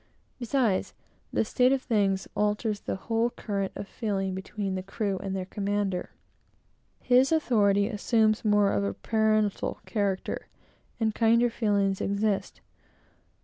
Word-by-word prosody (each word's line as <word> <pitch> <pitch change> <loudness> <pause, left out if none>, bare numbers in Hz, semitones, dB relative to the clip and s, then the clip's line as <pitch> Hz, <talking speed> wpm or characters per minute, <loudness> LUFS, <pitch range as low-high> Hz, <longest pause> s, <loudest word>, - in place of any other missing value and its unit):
Besides, 240 -5 0 0.4
this 220 - 0
state 250 +1 +3
of 270 -1 +1
thing 200 -5 +2 0.2
alters 210 0 0
the - - -4
whole 225 +4 0
current 200 -5 -3
of 200 - -6
feeling 195 -4 -2
between 190 +1 -4
the 185 - -2
crew 195 0 -3
and 195 -1 -4
their 185 -1 -3
commander. 200 -1 -2 0.9
His 255 +3 +4
authority 205 -10 +3
assumes 220 0 +1
more 210 -2 +3
of 100 - +1
the 100 0 -2
parental 215 -2 0
character; 200 -4 -2 0.5
and 220 -2 +1
kinder 235 +1 +3
feelings 200 -4 +1
exist. 200 0 -1
210 Hz, 130 wpm, -27 LUFS, 195-225 Hz, 0.9 s, His